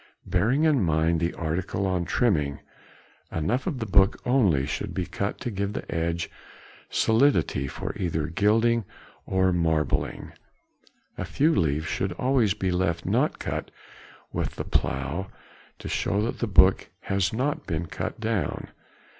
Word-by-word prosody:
Bearing 115 - +2
in 150 -6 +4
mind 80 0 +2
the 85 +1 -1
article 85 +4 -2
on 90 -2 0
trimming, 80 - +1 0.7
enough 105 - -1
of 160 -8 -1
the 115 - -3
book 95 -1 +4
only 105 - +3
should - - -4
be 90 - -1
cut 100 +4 -3
to 120 - -3
give 100 0 -2
the - - -5
edge 85 0 -1 0.6
solidity 110 - +2
for - - -5
either 85 -6 -1
gilding 110 +7 +2 0.4
or 95 -1 +2
marbling. 80 -3 0 0.9
A - - -1
few 155 +4 +2
leaves 80 - +1
should 95 +1 -2
always 125 -2 +2
be 95 -3 -1
left 90 -2 0
not - - +1
cut - - -4 0.6
with - - -2
the - - -4
plough, 70 +9 -1 0.5
to - - -8
show 100 - 0
that 115 - -3
the 120 - 0
book 95 -2 +5
has 95 -2 0
not 135 +7 -2
been 85 -1 -2
cut - - -5
down. 110 -3 -2
95 Hz, 145 wpm, -26 LUFS, 85-110 Hz, 0.9 s, book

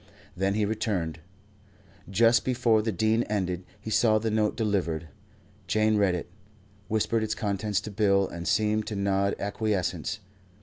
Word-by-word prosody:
Then 95 +2 0
he 105 -1 +1
returned. 100 -7 -2 0.9
Just 115 +4 +4
before 120 -3 +2
the 110 +1 -1
Dean 110 +4 +2
ended, 95 -4 -2 0.2
he 110 - -7
saw 110 -1 +4
the 110 +1 -1
note 105 -1 +1
delivered. 90 -7 -1 0.6
Jane 110 +3 +2
read 100 -4 +3
it, 85 - -5 0.6
whispered 110 +1 +1
its 110 0 -1
contents 105 0 -1
to 105 - -7
Bill 100 -2 +2
and 85 0 -7
seemed 110 0 +1
to 105 - -3
nod 100 0 +1
acquiescence. 100 -1 -2
105 Hz, 145 wpm, -27 LUFS, 95-110 Hz, 0.9 s, Just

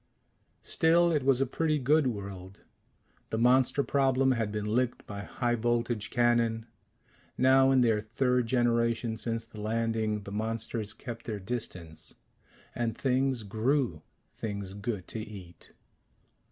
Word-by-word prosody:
Still 170 +1 +3
it 150 -3 +2
was 135 0 +3
a - - +4
pretty 155 +4 0
good 145 +2 +3
world. 100 -4 -6 0.7
The 110 - -2
monster 130 +4 +3
problem 135 -1 +2
had 115 -4 0
been 105 0 -3
licked 120 +3 0
by 100 -1 -6
high 120 +3 -1
voltage 120 -2 0
cannon. 120 -2 +2 0.7
Now 130 +1 +5
in 135 -1 +4
their 110 -3 +3
third 125 +2 0
generation 115 -1 +1
since 115 0 -3
the 110 -2 -10
landing, 110 -1 -1
the 100 - -8
monsters 110 0 -2
kept 120 -3 -8
their 105 -3 -4
distance. 90 -7 -6 0.6
And 115 -2 -2
things 130 -2 +1
grew 110 - 0 0.3
things 100 -3 -5
good 100 -2 -4
to 110 - -5
eat. 100 -5 -10
115 Hz, 135 wpm, -29 LUFS, 105-130 Hz, 0.7 s, Now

